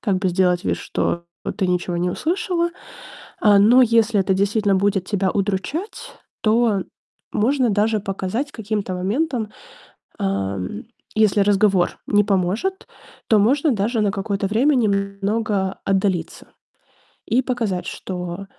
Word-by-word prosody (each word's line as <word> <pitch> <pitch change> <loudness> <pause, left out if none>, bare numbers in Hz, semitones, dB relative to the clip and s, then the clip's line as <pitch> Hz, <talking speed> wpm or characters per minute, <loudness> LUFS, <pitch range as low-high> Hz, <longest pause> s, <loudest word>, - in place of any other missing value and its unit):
как 200 -4 0
бы 185 -1 0
сделать 180 -1 +1
вид, - - 0
что 170 0 -2 0.3
ты 190 - 0
ничего 180 -1 -1
не 175 +1 0
услышала. 345 - -1 0.7
А, 205 -1 +5
но 235 +6 +6
если 230 -2 +3
это 190 0 +2
действительно 200 +1 +1
будет 195 -1 +1
тебя 195 -2 0
удручать, 205 - -3 0.3
то 220 -3 +2 0.5
можно 250 +3 +2
даже 215 +1 +1
показать 195 +8 -3
каким-то 205 -4 -3
моментом. 220 - -1 0.7
Ам, 95 -1 -3 0.3
если 215 -1 +3
разговор 200 -2 +2
не 205 0 +3
поможет, 200 - -1 0.4
то 220 - +5
можно 275 +8 +3
даже 225 +2 0
на 205 -2 +1
какое-то 200 0 -2
время 250 +9 +3
немного 200 -2 -1
отдалиться. 190 -3 -1 0.8
И 240 +4 +2
показать, 230 -8 -2
что, 180 +1 -6
205 Hz, 125 wpm, -21 LUFS, 190-230 Hz, 0.8 s, но